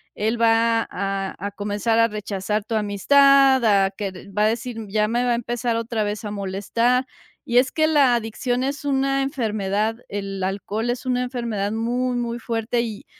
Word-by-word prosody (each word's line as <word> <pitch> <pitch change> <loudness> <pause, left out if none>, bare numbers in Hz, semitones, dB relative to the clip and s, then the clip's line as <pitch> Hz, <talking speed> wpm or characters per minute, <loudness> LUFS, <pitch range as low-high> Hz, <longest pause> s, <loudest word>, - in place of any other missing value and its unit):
él 225 +2 -1
va 230 0 +3
a 195 0 -3
a 205 - -3
comenzar 205 +2 -1
a 230 - +4
rechazar 210 0 -3
tu 225 - -3
amistad 265 +6 +4
a 200 -3 +3
que 200 +1 -4
v 190 +2 -12
va 210 - +3
a - - +5
decir: 240 +1 -3
"Ya 210 +1 +1
me 240 +3 0
va 245 - +1
a - - +3
empezar 240 0 -2
otra 230 -1 -2
vez 210 +2 -4
a 210 - -4
molestar", 210 +6 0 0.4
y 240 - +1
es 260 - +1
que 315 -1 +2
la 280 -6 +4
adicción 245 +2 -2
es 280 +2 -3
una 275 -1 +1
enfermedad 215 -5 -1
el 195 -1 -4
alcohol 205 +4 -2
es 245 +2 -3
una 250 0 0
enfermedad 235 -5 -3
muy 245 +3 -1
muy 235 0 -3
fuerte, 230 0 -1
y 220 -3 -6
225 Hz, 185 wpm, -22 LUFS, 205-245 Hz, 0.4 s, a